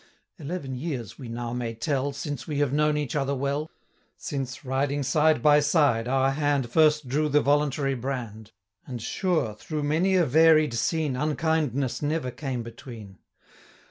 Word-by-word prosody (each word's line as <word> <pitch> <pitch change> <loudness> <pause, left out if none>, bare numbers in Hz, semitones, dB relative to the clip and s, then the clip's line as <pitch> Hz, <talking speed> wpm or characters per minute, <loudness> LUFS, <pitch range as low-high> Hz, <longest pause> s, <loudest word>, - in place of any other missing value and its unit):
Eleven 150 -3 -5
years 130 - -5
we 125 -4 -8
now 120 0 -4
may 120 -2 -3
tell, 135 +4 -1
Since 140 -2 -5
we 150 -3 -3
have 145 -2 +1
known 150 0 +2
each 145 -3 -3
other 140 -1 0
well; 140 +3 -2 0.5
Since, 135 -2 -5
riding 140 +2 0
side 150 0 +2
by 150 -1 +6
side, 145 -6 +2
our 135 +1 +2
hand 140 -3 0
First 150 -1 +3
drew 150 +4 0
the 150 +1 +4
voluntary 145 -1 +1
brand; 120 -4 -5 0.4
10 - - -10
And 120 - -4
sure, 170 - 0
through 150 +7 -5
many 165 +6 +2
a 180 -2 +4
varied 155 0 +5
scene,, 145 +4 0
Unkindness 150 -2 0
never 150 -3 -1
came 130 -3 -4
between. 115 -4 -11
140 Hz, 160 wpm, -26 LUFS, 125-150 Hz, 0.5 s, by